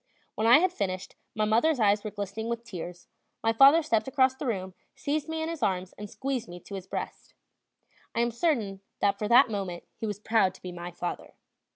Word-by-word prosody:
When 220 - 0
I 240 - +9
had 360 +3 +2
finished, 185 - -3 0.2
my 215 0 +1
mother's 240 +7 +3
eyes 205 -1 +3
were 215 - -3
glistening 205 +2 -5
with 235 0 -3
tears; 180 -5 -8 0.4
my 225 0 +3
father 275 +7 +7
stepped 225 -7 +1
across 260 -1 +3
the 265 +1 -5
room, 190 -5 -2 0.2
seized 300 +2 -2
me 320 0 -2
in - - -2
his 330 -3 -5
arms, 185 -3 -1
and 210 0 -8
squeezed 265 -1 -3
me 175 0 -8
to 200 - -12
his 190 -1 -6
breast. - - -6 0.8
I 230 - +2
am 235 0 +1
certain 230 - 0 0.2
that 200 0 +2
for 210 - -1
that 240 +1 +6
moment 190 -4 -4
he 220 - -4
was 205 -2 -3
proud 210 -3 +2
to - - -17
be 180 - -5
my 175 0 -6
father. 175 0 -6
215 Hz, 215 wpm, -28 LUFS, 195-260 Hz, 0.8 s, I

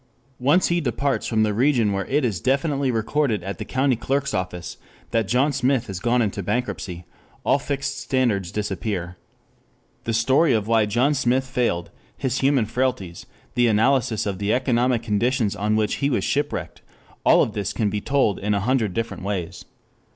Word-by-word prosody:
Once 145 +9 +3
he 170 0 +1
departs 140 0 -1
from 110 -2 +2
the 105 -1 +1
region 120 -2 +2
where 95 0 -2
it 145 0 +1
is 105 -7 -2
definitely 140 +2 +1
recorded 115 -2 0
at 95 -2 -5
the - - -3
County 130 0 +1
Clerk's 140 +4 -1
office 90 -2 -4 0.3
that 115 -3 +1
John 130 +7 +2
Smith 130 -1 +1
has 95 -2 -6
gone 120 +3 +2
into 100 -1 -2
bankruptcy, 90 -5 -3 0.4
all 140 - +3
fixed 140 0 -3
standards 110 -9 0
disappear. 95 -3 -3 0.9
The 115 - -1
story 130 +6 +3
of 110 -3 +1
why 110 -2 +3
John 125 +8 +2
Smith 130 -1 +1
failed, 120 -10 -1 0.3
his 130 0 -1
human 135 -4 +3
frailties, 105 -8 -2 0.3
the 120 -1 +3
analysis 115 +1 +2
of 100 -2 -3
the 100 +1 0
economic 125 -1 +1
conditions 115 0 0
on 105 +2 0
which 110 -1 0
he 140 - +1
was 125 - 0
shipwrecked, 145 +1 -2 0.4
all - - +6
of 110 - -3
this 100 -2 -2
can 105 -4 -1
be 105 0 -2
told 135 -7 +1
in 105 +1 0
a - - +1
hundred 110 -3 0
different 115 -3 -3
ways. 95 -4 -4
115 Hz, 175 wpm, -23 LUFS, 105-135 Hz, 0.9 s, all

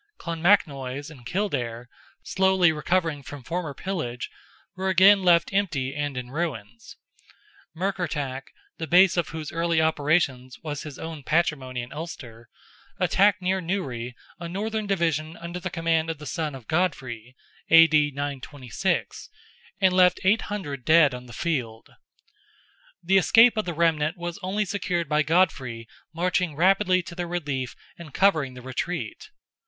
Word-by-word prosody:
Clonmacnoise 150 -5 0
and 125 -6 -12
Kildare, 125 - -2 0.4
slowly 190 -2 +3
recovering 160 -1 -1
from 140 0 -10
former 165 -1 -4
pillage, 155 -11 -4 0.4
were 190 +1 -2
again 190 +2 +6
left 175 0 +3
empty 155 -10 0
and 145 -2 -3
in 125 0 -6
ruins. 120 -9 -5 0.8
Murkertach, 160 -8 -2 0.3
the 160 - -4
base 180 +2 +6
of 175 -3 0
whose 155 -2 -6
early 165 0 +1
operations 145 -5 +1
was 150 -2 -4
his 150 -4 -8
own 160 -2 -7
patrimony 135 -5 0
in 120 - -10
Ulster, 120 -8 -8 0.5
attacked 200 0 +3
near 190 +1 +1
Newry 130 -10 -3 0.2
a 170 0 -6
Northern 215 +3 -3
division 165 -4 -1
under 170 +1 -6
the 185 - -4
command 165 -1 0
of 165 - -3
the 150 - -10
son 155 -3 -3
of 130 -4 -11
Godfrey 130 -9 -2 0.3
(A.D. 155 -2 +6
926), 140 -2 -3 0.5
and 190 -2 +4
left 180 -1 +4
800 190 - -1
dead 155 -1 +5
on 125 0 -8
the - - -12
field. 120 -5 -3 1.1
The 190 +3 +4
escape 225 +5 +6
of 215 - -1
the 175 -2 -4
remnant 160 0 +1
was 175 +1 -5
only 200 +3 -1
secured 180 -3 -2
by 150 +1 +2
Godfrey 140 -8 0 0.2
marching 175 -1 0
rapidly 185 +2 +3
to 170 - -9
their 175 0 -4
relief 145 -7 -3 0.2
and 165 -3 -10
covering 155 -10 +2
the 125 - -10
retreat. 130 +7 -4
160 Hz, 140 wpm, -25 LUFS, 140-180 Hz, 1.1 s, again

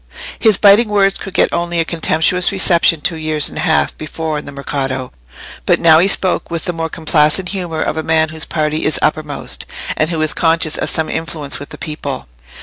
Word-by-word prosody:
His 215 -4 +5
biting 210 +2 +5
words 195 -2 +2
could 195 -1 -8
get - - +2
only 170 0 -1
a 165 - +1
contemptuous 170 +2 +1
reception 170 -4 +3
two 165 +2 -1
years 155 -1 -1
and - - -7
a - - -1
half 160 -1 +1
before 155 0 -4
in - - -10
the 145 - -8
Mercato, 135 -2 -4 0.6
but - - +3
now 160 -1 +6
he 180 - +3
spoke 190 -2 +1
with 170 +1 -3
the 175 - -2
more 165 -1 -3
complacent 160 +3 +1
humour 175 -5 -3
of 155 - -3
a - - 0
man 160 0 +1
whose 160 0 -6
party 155 -1 -2
is 155 - 0
uppermost, 150 -2 -2 0.3
and 155 - 0
who 165 -2 -2
is 155 - +1
conscious 165 -2 +1
of - - +2
some 160 -1 +2
influence 155 -4 -4
with 145 - -9
the - - -9
people. 145 - -5
160 Hz, 210 wpm, -16 LUFS, 155-175 Hz, 0.6 s, now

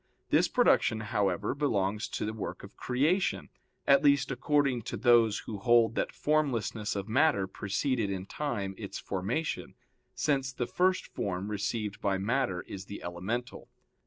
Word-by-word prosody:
This - - +4
production, 110 - +3
however, 105 -2 0
belongs 105 -8 0
to - - -3
the 110 - -3
work 110 - -6
of - - -12
creation, 150 +10 0 0.4
at 140 - +5
least, 140 -1 +4
according 135 -1 +1
to - - -4
those 115 -4 +4
who 105 -3 -5
hold 115 0 +4
that - - -1
formlessness 125 -9 0
of 100 0 -3
matter 110 -3 +3
preceded 105 +4 -1
in 95 -1 -3
time 100 -6 -3
its 100 -3 -6
formation, 105 - -3 0.4
since 135 -3 0
the 125 -2 -2
first 185 +7 +1
form 95 +1 -3
received 105 +1 -3
by 100 -1 +1
matter 105 -2 0
is 95 -1 -8
the 100 - -8
elemental. 105 +9 -4
110 Hz, 150 wpm, -30 LUFS, 100-135 Hz, 0.4 s, at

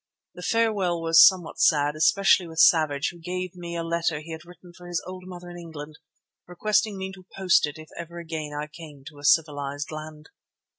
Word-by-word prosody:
The 180 - -11
farewell 200 -4 +1
was 165 0 +7
somewhat 185 -4 -1
sad, 145 -1 +3
especially 185 +3 +3
with 160 0 -11
Savage, 155 -4 +4
who 175 - -15
gave 180 +1 -5
me 170 -1 -7
a 165 - -2
letter 165 -2 -1
he 160 +2 -10
had 160 -1 -7
written 175 0 -16
for 175 +1 -13
his 175 -1 -1
old 185 0 -9
mother 180 -1 -9
in 175 - -9
England, 155 -3 -10 0.5
requesting 210 +3 0
me 190 0 -5
to 185 -1 -15
post 185 -5 +3
it 150 - -8
if 155 0 -12
ever 170 0 -8
again 160 -3 -5
I 145 0 -4
came 150 -2 -13
to 145 - -16
a - - -13
civilized 145 -2 +1
land. 155 0 -9
170 Hz, 200 wpm, -25 LUFS, 155-180 Hz, 0.5 s, was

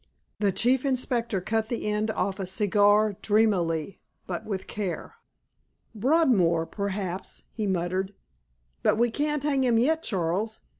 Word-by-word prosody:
The 205 -2 +2
Chief 245 +7 +2
Inspector 245 -6 0
cut 220 +3 -1
the 235 - -3
end 210 +1 0
off 200 -2 -2
a 190 - -3
cigar 205 +1 +3
dreamily 195 -6 +1 0.3
but 175 -2 -5
with 195 -3 -4
care. 195 - -4 0.8
"Broadmoor—perhaps," 200 - 0
he 215 -2 -3
muttered. 190 +2 -1 0.7
"But - - +2
we 235 0 +2
can't 295 +2 -1
hang 280 -3 +1
him 240 -3 +3
yet, 315 +7 +2
Charles. 195 - -2
210 Hz, 130 wpm, -26 LUFS, 190-235 Hz, 0.8 s, cigar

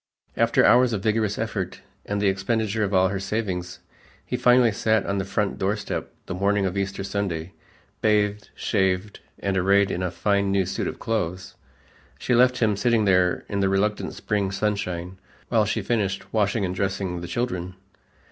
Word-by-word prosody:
After - - +3
hours 125 -1 +5
of 100 -3 -2
vigorous 110 -2 +1
effort 105 -5 -3 0.3
and 100 0 -1
the 100 - +2
expenditure 110 +2 0
of 100 - -1
all 95 -1 +4
her 95 0 -2
savings, 95 -4 -3 0.4
he - - -3
finally 125 -1 +5
sat 110 +1 +1
on 100 0 -1
the 95 - -2
front 100 0 -1
doorstep 105 +2 -2
the - - -5
morning 100 +2 +1
of 95 0 -2
Easter 100 0 -2
Sunday, 95 -3 -3 0.5
bathed, 105 -1 +1
shaved 95 0 0 0.2
and 100 -1 -2
arrayed 100 +1 +3
in 90 - -2
a 90 - 0
fine 100 +3 0
new 95 -1 +2
suit 95 - -2
of - - -5
clothes. 95 -4 -3 0.6
She 125 - -1
left 125 +1 +4
him 105 -2 +3
sitting 115 +1 +2
there 90 -2 +2
in 100 - -2
the 95 -1 +2
reluctant 105 +2 0
spring 100 -2 -1
sunshine 95 -3 -2 0.3
while 110 -3 +3
she 110 0 -1
finished 100 -3 -2
washing 105 -1 +1
and 90 - -2
dressing 95 -2 -2
the 85 - -6
children. 95 -3 -3
100 Hz, 175 wpm, -24 LUFS, 95-105 Hz, 0.6 s, hours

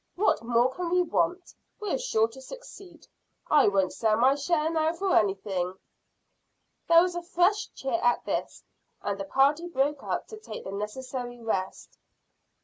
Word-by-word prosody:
What 390 - +2
more 240 +2 +2
can 355 +3 -3
we 360 +1 +3
want? 350 +1 -1 0.3
We're 420 +3 -2
sure 225 - +2
to 265 +4 -12
succeed. 375 - -12 0.5
I 295 -2 +6
won't 195 -2 +2
sell 220 -1 +1
my 255 +4 +5
share 305 +2 0
now 320 0 +1
for 380 +2 0
anything." 190 -3 0 1.1
There 335 0 +7
was 360 -1 -1
a 350 - -3
fresh 360 +4 +1
cheer 260 -4 -2
at 240 0 +2
this, - - -3 0.4
and 200 -1 -2
the 195 - -3
party 285 - +2
broke 290 -2 0
up - - -3
to 435 - -8
take 225 - -8
the 190 - -6
necessary 245 +4 -5
rest. 195 -5 -4
275 Hz, 160 wpm, -27 LUFS, 225-350 Hz, 1.1 s, There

